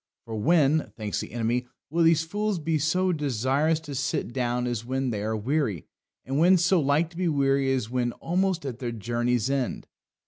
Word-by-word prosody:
For 115 - -6
when, 155 +5 +2
thinks 105 -2 -3
the - - -6
enemy, 120 +2 -1 0.2
will 170 +1 +2
these 165 -1 +4
fools 205 +4 -1
be 160 -1 -1
so 180 +5 +1
desirous 145 +2 +1
to 150 -3 -8
sit 135 -3 -2
down 125 -1 -1
as 120 -2 -2
when 130 +1 -1
they 105 -2 -3
are 110 +1 -1
weary, 115 - -1 0.4
and 135 +2 -1
when 180 +3 +6
so 175 +1 +3
like 150 +3 +1
to 170 - -13
be 180 -1 0
weary 135 -3 +2
as 130 -5 0
when 125 -1 0
almost 180 -1 -1
at 125 -3 -5
their 120 -2 -3
journey's 120 +1 -1
end? 135 -3 -2
135 Hz, 195 wpm, -26 LUFS, 120-165 Hz, 0.4 s, when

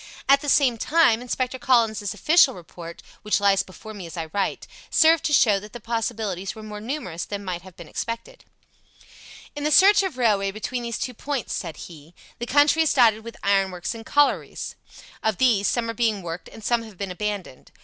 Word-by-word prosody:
At 275 +1 +5
the 290 - -3
same 255 -5 +3
time, 290 -8 +3
Inspector 255 +1 -3
Collins's 225 -5 +2
official 310 -5 +4
report 170 -1 -11 0.2
(which 210 -1 +1
lies 200 -1 +3
before 195 +3 -11
me 190 -5 -8
as 165 +1 -10
I 160 -1 -5
write) 200 -1 -2 0.2
served 320 0 +4
to - - 0
show 215 -8 +4
that 210 +2 -13
the 240 - -7
possibilities 220 -4 -3
were 220 - -10
more 210 -1 -8
numerous 220 - -4
than 205 -1 -6
might 180 -2 -4
have 185 -1 -15
been 170 - -10
expected. 230 - -6 1.1
"In 290 - -5
the 300 - +1
stretch 390 +6 +6
of 380 -9 -3
railway 205 -5 +2
between 220 +5 -4
these 235 -2 -4
two 250 - -4
points," 275 +2 -4
said 165 -5 -5
he, 165 0 -14 0.2
"the 240 - -4
country 290 +4 +4
is 320 - +2
dotted 225 -4 +4
with 230 -1 -9
ironworks 195 -1 0
and 225 -1 -9
collieries. 290 +5 0 0.5
Of 220 -3 0
these, 225 -6 +3
some 235 -1 0
are 230 - -3
being 220 -4 0
worked 170 +1 -6
and 220 - -13
some 235 +2 +1
have 220 -4 -12
been 195 -1 -4
abandoned. 200 -7 -5
220 Hz, 200 wpm, -24 LUFS, 195-255 Hz, 1.1 s, stretch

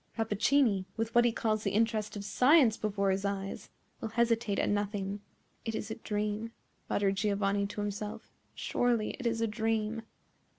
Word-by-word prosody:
Rappaccini, 225 -1 +2
with 225 0 -2
what 240 0 +5
he 240 - +4
calls 220 -1 0
the 200 - 0
interest 220 -1 +1
of 200 -1 -5
science 250 +3 +5
before 200 -3 0
his 190 +1 -1
eyes, 195 -1 -3 0.3
will 225 - -4
hesitate 230 -2 +1
at - - +1
nothing." 205 -1 -1 0.4
"It 225 -1 -3
is 220 0 -4
a - - -2
dream," 210 +1 -3 0.4
muttered 195 -1 +1
Giovanni 200 -1 +1
to 205 +1 -5
himself; 210 +2 -5 0.2
"surely 235 -3 +1
it 255 - -1
is 230 0 0
a 230 - +2
dream." 220 0 -1
215 Hz, 165 wpm, -31 LUFS, 205-230 Hz, 0.4 s, what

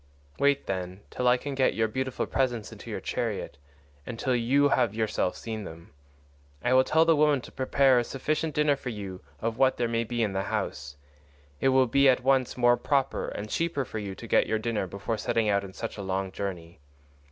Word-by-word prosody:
Wait, 140 0 +2
then, 95 0 -4
till 125 - -1
I 125 +1 +5
can 140 +2 -5
get 135 -1 +2
your 110 0 +2
beautiful 130 +3 -2
presents 120 -5 -1
into - - -10
your - - -3
chariot, 70 - -3 0.4
and 115 - -7
till 130 +1 0
you 135 +5 +3
have 110 - +2
yourself 110 -4 0
seen 110 -2 -5
them. 85 -2 -11 0.7
I 125 - +2
will 130 0 +6
tell 160 +4 +3
the 165 -1 +5
women 150 -2 +3
to - - -12
prepare 135 -1 +3
a - - +1
sufficient 155 +5 -2
dinner 150 -1 +3
for 135 -2 -6
you 100 -5 -6 0.2
of 115 +1 -2
what 130 -1 +4
there 120 - +1
may 115 0 0
be 120 0 -1
in 105 -3 -1
the 95 - 0
house; 70 -6 -4 0.6
it 135 - +3
will 130 0 +5
be 140 +3 +4
at 125 -1 +2
once 130 -1 +2
more 120 0 +4
proper 135 -2 0
and 105 - -5
cheaper 150 +3 -1
for 110 - -5
you 100 -2 -5
to - - -9
get - - +3
your 110 - +1
dinner 110 -3 -2
before 100 +5 -4
setting 115 -2 +1
out 100 -1 +2
on 95 -1 -9
such 115 +1 -6
a - - -3
long 95 0 -2
journey. 90 -5 -6
120 Hz, 215 wpm, -27 LUFS, 100-135 Hz, 0.7 s, will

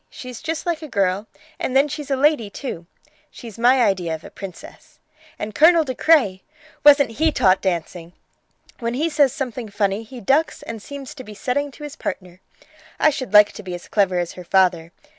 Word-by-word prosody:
She's 250 -2 -9
just 325 +2 -4
like 340 -2 -1
a 310 - -7
girl, 200 -3 0 0.3
and 260 - -3
then 280 +2 +4
she's 295 -1 -6
a 275 - +1
lady, 270 -5 +2
too. 200 - -7 0.4
She's 230 -2 -11
my 250 +2 +4
idea 185 -6 0
of 160 - -12
a - - -11
princess. 195 - -11 0.4
And 210 +1 -5
Colonel 325 +6 +5
De 260 -4 -4
Craye! 250 -11 +3 0.4
Wasn't 285 -4 +6
he 315 +7 +1
taught 190 -8 +3
dancing! 175 -1 -3 0.7
When 235 -1 -2
he 310 +5 0
says 290 -4 +3
something 250 -5 -5
funny 200 0 -1
he 240 +3 -11
ducks 275 +9 +1
and 225 -2 -7
seems 280 +4 -9
to 270 -3 -10
be 215 -3 -11
setting 285 +7 -2
to 300 - -12
his 295 0 -7
partner. 185 - -6 0.6
I 310 - +5
should 260 -2 -5
like 210 0 +7
to - - -10
be 185 -3 -6
as 175 - -10
clever 195 -3 +1
as 175 -1 -2
her 180 - -10
father. 175 -2 +2
235 Hz, 200 wpm, -21 LUFS, 190-285 Hz, 0.7 s, like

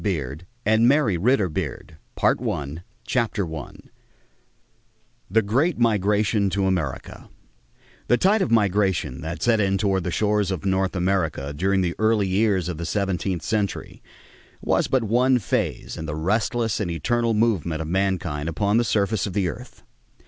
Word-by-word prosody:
THE 100 -5 +1 0.5
COLONIAL 110 - +3
PERIOD 100 - -1 1.1
CHAPTER 105 -9 -1
I 75 - -7 1.6
THE 110 +4 +3
GREAT 135 - +1
MIGRATION 105 -2 +2
TO 95 +1 0
AMERICA 85 -8 -3 0.8
The 120 - +4
tide 200 - +3
of 190 - 0
migration 100 - +1
that 80 +3 -5
set 115 -2 +3
in 95 -1 +2
toward 95 -2 0
the 90 - -2
shores 105 +2 +1
of 95 -2 -4
North 95 0 0
America 90 -6 -1
during 95 +4 +1
the 85 -2 0
early 110 -2 +2
years 95 -2 +1
of 90 -3 -4
the 85 - -3
seventeenth 95 -3 -1
century 105 -4 -3 0.6
was - - +1
but 130 -3 +1
one 125 +4 +3
phase 105 - -2
in 80 - -5
the 75 - -3
restless 110 +6 0
and 100 -5 -2
eternal 115 +8 0
movement 95 -8 +1
of - - -7
mankind 85 -4 -1
upon 100 +6 +1
the 120 - +3
surface 105 -2 0
of 95 - -6
the 100 -2 +1
earth. - - -10
100 Hz, 145 wpm, -23 LUFS, 90-110 Hz, 1.6 s, The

